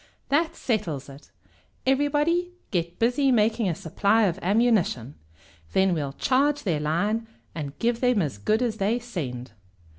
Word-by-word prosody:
"That 315 Hz, +4 st, +1 dB
settles 170 Hz, -, -2 dB
it. 140 Hz, +2 st, -13 dB, 0.6 s
Everybody 295 Hz, +6 st, +1 dB, 0.2 s
get 175 Hz, -1 st, -2 dB
busy 255 Hz, +4 st, +2 dB
making 225 Hz, -2 st, +2 dB
a 165 Hz, -, -1 dB
supply 200 Hz, +5 st, +1 dB
of 185 Hz, -2 st, 0 dB
ammunition. 195 Hz, -, +1 dB, 0.6 s
Then 190 Hz, -1 st, +3 dB
we'll 145 Hz, -4 st, -2 dB
charge 285 Hz, -, +1 dB
their 170 Hz, -7 st, 0 dB
line, 195 Hz, +10 st, 0 dB, 0.3 s
and 145 Hz, -3 st, -6 dB
give 235 Hz, 0 st, 0 dB
them 250 Hz, -4 st, +3 dB
as 145 Hz, -, -2 dB
good 215 Hz, -, +1 dB
as 225 Hz, -3 st, -1 dB
they 210 Hz, +4 st, +1 dB
send!" 135 Hz, -, -5 dB
210 Hz, 145 wpm, -25 LUFS, 165-245 Hz, 0.6 s, Then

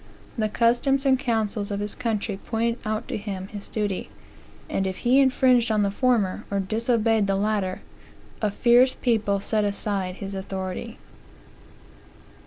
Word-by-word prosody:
The 215 Hz, -2 st, 0 dB
customs 245 Hz, +5 st, +2 dB
and 265 Hz, -1 st, +4 dB
councils 220 Hz, -4 st, -1 dB
of 200 Hz, -1 st, -2 dB
his 205 Hz, 0 st, -1 dB
country 220 Hz, -4 st, -2 dB
pointed 230 Hz, +3 st, -2 dB
out 215 Hz, 0 st, -2 dB
to -, -, -2 dB
him 195 Hz, -2 st, -6 dB
his 205 Hz, -1 st, -8 dB
duty; 205 Hz, -3 st, -2 dB, 0.6 s
and 195 Hz, -, -1 dB
if 190 Hz, -, -4 dB
he 255 Hz, +3 st, +5 dB
infringed 255 Hz, -3 st, +4 dB
on 215 Hz, -1 st, +2 dB
the 200 Hz, -, +1 dB
former, 225 Hz, -5 st, +1 dB
or 200 Hz, -, -1 dB
disobeyed 225 Hz, +1 st, +1 dB
the 195 Hz, -, +1 dB
latter, 200 Hz, -2 st, -1 dB, 0.6 s
a 215 Hz, -, +2 dB
fierce 245 Hz, +5 st, +4 dB
people 215 Hz, -5 st, +1 dB
set 215 Hz, +2 st, 0 dB
aside 200 Hz, -2 st, -2 dB
his 195 Hz, 0 st, -6 dB
authority. 190 Hz, +3 st, -5 dB
215 Hz, 150 wpm, -25 LUFS, 200-235 Hz, 0.6 s, he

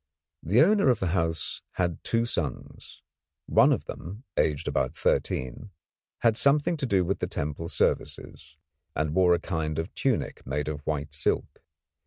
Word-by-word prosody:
The 105 Hz, -, +4 dB
owner 200 Hz, -4 st, +4 dB
of 120 Hz, -4 st, +3 dB
the 95 Hz, -, 0 dB
house 80 Hz, -3 st, -1 dB
had 90 Hz, -2 st, -2 dB
two 115 Hz, 0 st, +1 dB
sons. 75 Hz, -, -5 dB, 0.4 s
One -, -, +5 dB
of -, -, 0 dB
them, 100 Hz, -, -8 dB
aged 75 Hz, -2 st, +1 dB
about -, -, 0 dB
thirteen, 65 Hz, -, -1 dB, 0.5 s
had 115 Hz, -2 st, +4 dB
something 145 Hz, +6 st, +3 dB
to 140 Hz, -3 st, -2 dB
do 95 Hz, -5 st, +2 dB
with 95 Hz, +3 st, -1 dB
the -, -, -1 dB
temple 75 Hz, +3 st, -4 dB
services, 75 Hz, -, -2 dB, 0.4 s
and 75 Hz, 0 st, 0 dB
wore 90 Hz, -1 st, +5 dB
a -, -, -2 dB
kind 80 Hz, -3 st, -2 dB
of 80 Hz, +3 st, -3 dB
tunic 130 Hz, -4 st, -1 dB
made 75 Hz, +3 st, -2 dB
of 75 Hz, -1 st, -3 dB
white 75 Hz, -1 st, -2 dB
silk. 75 Hz, -, -1 dB
85 Hz, 160 wpm, -27 LUFS, 75-115 Hz, 0.5 s, One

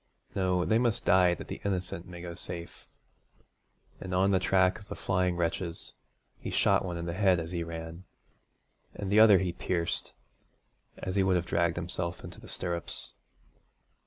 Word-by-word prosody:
No! 90 Hz, -2 st, +1 dB
they 110 Hz, +1 st, +3 dB
must 120 Hz, -3 st, 0 dB
die 90 Hz, -2 st, +5 dB
that -, -, -9 dB
the -, -, -6 dB
innocent 90 Hz, -3 st, -2 dB
may 90 Hz, -1 st, -9 dB
go 85 Hz, -1 st, -5 dB
safe,' 85 Hz, 0 st, -8 dB, 1.1 s
and 95 Hz, -1 st, -4 dB
on 95 Hz, +2 st, +3 dB
the 95 Hz, -, +4 dB
track 95 Hz, 0 st, +3 dB
of 100 Hz, -, -15 dB
the -, -, -6 dB
flying 90 Hz, -2 st, 0 dB
wretches, 85 Hz, 0 st, -2 dB, 0.5 s
he -, -, -5 dB
shot -, -, +3 dB
one 90 Hz, -2 st, -3 dB
in 85 Hz, -, -4 dB
the 85 Hz, -, -3 dB
head 95 Hz, -2 st, +3 dB
as 80 Hz, +1 st, -5 dB
he 85 Hz, -2 st, -2 dB
ran, 80 Hz, +2 st, -7 dB, 0.9 s
and 100 Hz, -1 st, -4 dB
the 105 Hz, -, +6 dB
other 110 Hz, -3 st, +9 dB
he 90 Hz, -2 st, -1 dB
pierced, 85 Hz, -1 st, -2 dB, 0.8 s
as 95 Hz, -, -4 dB
he 100 Hz, -, +3 dB
would 95 Hz, -1 st, +3 dB
have 90 Hz, -1 st, +1 dB
dragged 85 Hz, -1 st, +1 dB
himself 85 Hz, 0 st, -2 dB
into -, -, -9 dB
the -, -, -12 dB
stirrups. 85 Hz, -2 st, -4 dB
90 Hz, 175 wpm, -30 LUFS, 85-95 Hz, 1.1 s, other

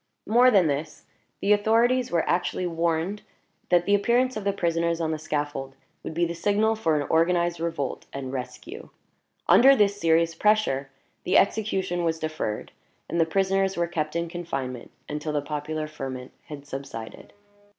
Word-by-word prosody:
More 240 Hz, +4 st, +5 dB
than 195 Hz, -7 st, +4 dB
this, 150 Hz, +1 st, -3 dB, 0.4 s
the 205 Hz, +1 st, +4 dB
authorities 230 Hz, +4 st, +2 dB
were 170 Hz, -2 st, 0 dB
actually 180 Hz, +1 st, 0 dB
warned 170 Hz, +3 st, -1 dB, 0.5 s
that 175 Hz, -1 st, +3 dB
the 200 Hz, -, +2 dB
appearance 240 Hz, +5 st, +2 dB
of 215 Hz, -, -4 dB
the 200 Hz, -, +3 dB
prisoners 170 Hz, -2 st, 0 dB
on 160 Hz, -1 st, -1 dB
the 155 Hz, -, -3 dB
scaffold 145 Hz, -3 st, -3 dB, 0.3 s
would 160 Hz, -, -7 dB
be 170 Hz, +1 st, +2 dB
the 170 Hz, -, -3 dB
signal 205 Hz, +5 st, +1 dB
for 160 Hz, -9 st, +1 dB
an 145 Hz, -, -2 dB
organized 170 Hz, +1 st, +2 dB
revolt 165 Hz, -5 st, -3 dB
and 135 Hz, -1 st, -6 dB
rescue. 130 Hz, -, -7 dB, 0.6 s
Under 270 Hz, +2 st, +7 dB
this 205 Hz, -3 st, +2 dB
serious 165 Hz, 0 st, +3 dB
pressure, 165 Hz, -8 st, +1 dB, 0.3 s
the -, -, +3 dB
execution 195 Hz, -4 st, +1 dB
was 165 Hz, -1 st, 0 dB
deferred, 155 Hz, -9 st, -4 dB, 0.4 s
and 170 Hz, +2 st, 0 dB
the 160 Hz, -, +2 dB
prisoners 195 Hz, +2 st, +1 dB
were 170 Hz, -, +2 dB
kept 160 Hz, -2 st, -3 dB
in 170 Hz, 0 st, -1 dB
confinement 135 Hz, -8 st, -5 dB, 0.2 s
until 150 Hz, +1 st, -4 dB
the 150 Hz, -, +1 dB
popular 150 Hz, +1 st, -4 dB
ferment 135 Hz, -4 st, -7 dB
had 145 Hz, -2 st, -9 dB
subsided. 135 Hz, -5 st, -8 dB
170 Hz, 160 wpm, -25 LUFS, 150-200 Hz, 0.6 s, Under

